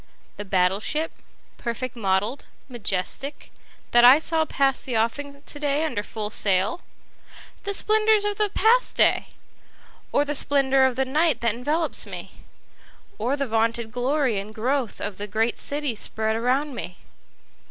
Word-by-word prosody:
The 205 Hz, -, -6 dB
battle 185 Hz, 0 st, +2 dB
ship, 310 Hz, +8 st, -1 dB, 0.5 s
perfect 240 Hz, +1 st, -4 dB
model'd, 205 Hz, +4 st, -1 dB, 0.2 s
majestic, 240 Hz, +3 st, -3 dB, 0.4 s
that 240 Hz, 0 st, +5 dB
I 250 Hz, +3 st, +9 dB
saw 320 Hz, 0 st, 0 dB
pass 270 Hz, -3 st, 0 dB
the 245 Hz, -4 st, -1 dB
offing 280 Hz, +5 st, -2 dB
to 290 Hz, -, -5 dB
day 290 Hz, +1 st, 0 dB
under 300 Hz, -10 st, -2 dB
full 210 Hz, 0 st, -5 dB
sail? 200 Hz, -, +1 dB, 0.8 s
The 400 Hz, -, -1 dB
splendors 430 Hz, 0 st, +3 dB
of 415 Hz, 0 st, -2 dB
the 420 Hz, -1 st, +2 dB
past 475 Hz, +4 st, +3 dB
day? -, -, +3 dB, 0.8 s
Or 290 Hz, -, +2 dB
the 295 Hz, -, -2 dB
splendor 270 Hz, -2 st, +4 dB
of 260 Hz, -2 st, +1 dB
the 265 Hz, +1 st, 0 dB
night 310 Hz, +4 st, +2 dB
that 235 Hz, -2 st, +1 dB
envelopes 300 Hz, +8 st, -2 dB
me? -, -, -8 dB, 0.9 s
Or 250 Hz, +6 st, 0 dB
the 280 Hz, -, -1 dB
vaunted 230 Hz, -1 st, -1 dB
glory 250 Hz, -2 st, 0 dB
and 210 Hz, +2 st, -9 dB
growth 250 Hz, +1 st, -1 dB
of 205 Hz, -2 st, -5 dB
the 205 Hz, -, -5 dB
great 220 Hz, +3 st, -1 dB
city 285 Hz, -3 st, -1 dB
spread 220 Hz, 0 st, -1 dB
around 260 Hz, +5 st, 0 dB
me? 180 Hz, -7 st, -7 dB
255 Hz, 150 wpm, -24 LUFS, 220-290 Hz, 0.9 s, I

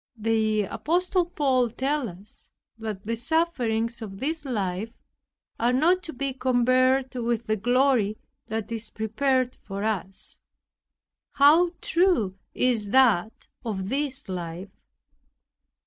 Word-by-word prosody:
The 220 Hz, -1 st, +1 dB
apostle 355 Hz, -, 0 dB
Paul 265 Hz, -8 st, +1 dB
tells 270 Hz, +3 st, -1 dB
us, 190 Hz, +4 st, -8 dB, 0.3 s
that 215 Hz, -3 st, -5 dB
"the 230 Hz, +2 st, -1 dB
sufferings 235 Hz, -5 st, 0 dB
of 195 Hz, -3 st, -7 dB
this 310 Hz, +4 st, -2 dB
life 205 Hz, -4 st, -2 dB, 0.7 s
are 235 Hz, +2 st, +3 dB
not 335 Hz, +8 st, +3 dB
to 320 Hz, -, -5 dB
be 275 Hz, +1 st, -2 dB
compared 255 Hz, +1 st, +2 dB
with 235 Hz, -2 st, -1 dB
the 215 Hz, -, +1 dB
glory 245 Hz, -1 st, +2 dB, 0.3 s
that 220 Hz, +1 st, -4 dB
is 225 Hz, -1 st, -4 dB
prepared 255 Hz, +3 st, 0 dB
for 200 Hz, 0 st, -5 dB
us." 195 Hz, -3 st, -3 dB, 0.9 s
How 325 Hz, +5 st, +5 dB
true 335 Hz, -, +2 dB, 0.2 s
is 230 Hz, -5 st, +1 dB
that 225 Hz, -5 st, +3 dB, 0.2 s
of 195 Hz, -4 st, -3 dB
this 275 Hz, -1 st, -2 dB
life! 180 Hz, 0 st, -5 dB
240 Hz, 115 wpm, -26 LUFS, 215-270 Hz, 0.9 s, How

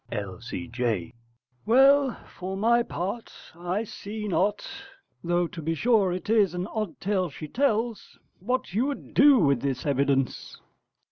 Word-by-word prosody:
L.C.J. 115 Hz, 0 st, -3 dB, 0.5 s
Well, 270 Hz, +3 st, +5 dB, 0.2 s
for 190 Hz, +1 st, -5 dB
my 235 Hz, +4 st, +3 dB
part, 205 Hz, +1 st, -4 dB, 0.2 s
I 175 Hz, +5 st, -2 dB
see 210 Hz, 0 st, -7 dB
not 200 Hz, +2 st, 0 dB, 0.6 s
though 175 Hz, +1 st, +1 dB
to 165 Hz, -, -8 dB
be 165 Hz, +2 st, -1 dB
sure 210 Hz, 0 st, +3 dB
it 180 Hz, -1 st, -5 dB
is 210 Hz, -5 st, +3 dB
an 180 Hz, +1 st, -2 dB
odd 215 Hz, 0 st, -4 dB
tale 190 Hz, -3 st, 0 dB
she 155 Hz, +2 st, -8 dB
tells 230 Hz, -, -1 dB, 0.2 s
what 250 Hz, 0 st, -2 dB
you 235 Hz, +7 st, +1 dB
would 285 Hz, -, -6 dB
do 280 Hz, -1 st, +7 dB
with 140 Hz, -, +3 dB
this 135 Hz, -2 st, -2 dB
evidence. 140 Hz, -2 st, 0 dB
190 Hz, 140 wpm, -26 LUFS, 150-225 Hz, 0.6 s, do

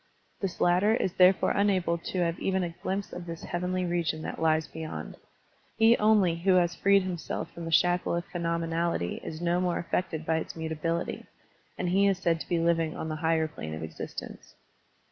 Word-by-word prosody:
This 195 Hz, -3 st, -4 dB
latter 185 Hz, +5 st, +4 dB
is 190 Hz, -6 st, -1 dB
therefore 185 Hz, +1 st, +5 dB
unable 190 Hz, -4 st, +2 dB
to 180 Hz, +2 st, -3 dB
have 170 Hz, -1 st, 0 dB
even 190 Hz, -1 st, 0 dB
a 170 Hz, -1 st, -4 dB
glimpse 195 Hz, +1 st, -3 dB
of 175 Hz, -1 st, -7 dB
this 165 Hz, -1 st, -7 dB
heavenly 180 Hz, +1 st, -2 dB
region 170 Hz, -2 st, -1 dB
that -, -, -5 dB
lies 160 Hz, -1 st, +3 dB
beyond. 160 Hz, -1 st, -6 dB, 0.6 s
He 225 Hz, +1 st, +6 dB
only 210 Hz, -6 st, +3 dB
who 185 Hz, +3 st, +2 dB
has 175 Hz, -1 st, +3 dB
freed 200 Hz, +2 st, +4 dB
himself 175 Hz, -4 st, -4 dB
from 170 Hz, -, -8 dB
the 165 Hz, -, -4 dB
shackle 175 Hz, +1 st, +3 dB
of 170 Hz, 0 st, -2 dB
phenom 170 Hz, -1 st, -2 dB
enality 165 Hz, -, -1 dB
is 160 Hz, +1 st, -6 dB
no 175 Hz, +1 st, +1 dB
more 180 Hz, -1 st, 0 dB
affected 165 Hz, -2 st, -2 dB
by 160 Hz, 0 st, +1 dB
its 160 Hz, -, -5 dB
mutability, 160 Hz, +1 st, -3 dB, 0.5 s
and 180 Hz, -, -1 dB
he 195 Hz, +2 st, +4 dB
is 195 Hz, -2 st, +2 dB
said 170 Hz, -3 st, +1 dB
to -, -, -8 dB
be 175 Hz, -, +2 dB
living 165 Hz, -1 st, +1 dB
on 160 Hz, -, -4 dB
the 155 Hz, -, -3 dB
higher 160 Hz, -1 st, +2 dB
plane 80 Hz, -, -7 dB
of 80 Hz, -, -6 dB
existence. 80 Hz, 0 st, -8 dB
170 Hz, 195 wpm, -28 LUFS, 165-185 Hz, 0.6 s, He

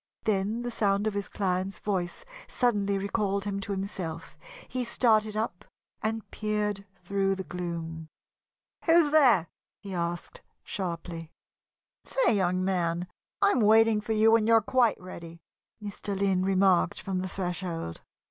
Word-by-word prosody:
Then 215 Hz, +3 st, 0 dB
the 245 Hz, -, -3 dB
sound 200 Hz, -2 st, +1 dB
of 215 Hz, -, 0 dB
his 200 Hz, -1 st, -3 dB
client's 190 Hz, 0 st, -1 dB
voice 185 Hz, -4 st, -3 dB, 0.2 s
suddenly 205 Hz, -5 st, +1 dB
recalled 200 Hz, 0 st, -1 dB
him 200 Hz, -1 st, -2 dB
to 200 Hz, -, -5 dB
himself. 190 Hz, -5 st, -4 dB, 0.3 s
He 255 Hz, 0 st, -2 dB
started 220 Hz, -3 st, +2 dB
up 215 Hz, -5 st, -3 dB, 0.4 s
and 220 Hz, 0 st, -2 dB
peered 210 Hz, -2 st, -2 dB
through 195 Hz, +1 st, 0 dB
the 190 Hz, -, -5 dB
gloom. 165 Hz, -2 st, -5 dB, 0.8 s
"Who's 330 Hz, -3 st, +5 dB
there?" 250 Hz, -, +5 dB, 0.3 s
he 195 Hz, -2 st, -8 dB
asked, 170 Hz, -1 st, -3 dB, 0.2 s
sharply. 170 Hz, -3 st, -5 dB, 0.7 s
"Say, -, -, +2 dB
young 185 Hz, -1 st, +1 dB
man, 175 Hz, -2 st, 0 dB, 0.4 s
I 200 Hz, -, +6 dB
am -, -, +1 dB
waiting 220 Hz, 0 st, +5 dB
for 220 Hz, +1 st, -2 dB
you 220 Hz, +1 st, +5 dB
when 225 Hz, -1 st, +4 dB
you're 230 Hz, 0 st, +6 dB
quite 235 Hz, +1 st, +2 dB
ready," 170 Hz, -2 st, -10 dB, 0.4 s
Mr. 205 Hz, -1 st, -4 dB
Lynn 190 Hz, -2 st, +2 dB
remarked 190 Hz, -2 st, +3 dB
from 190 Hz, -1 st, -3 dB
the 185 Hz, 0 st, -3 dB
threshold. 175 Hz, -, -4 dB
195 Hz, 140 wpm, -28 LUFS, 180-215 Hz, 0.8 s, I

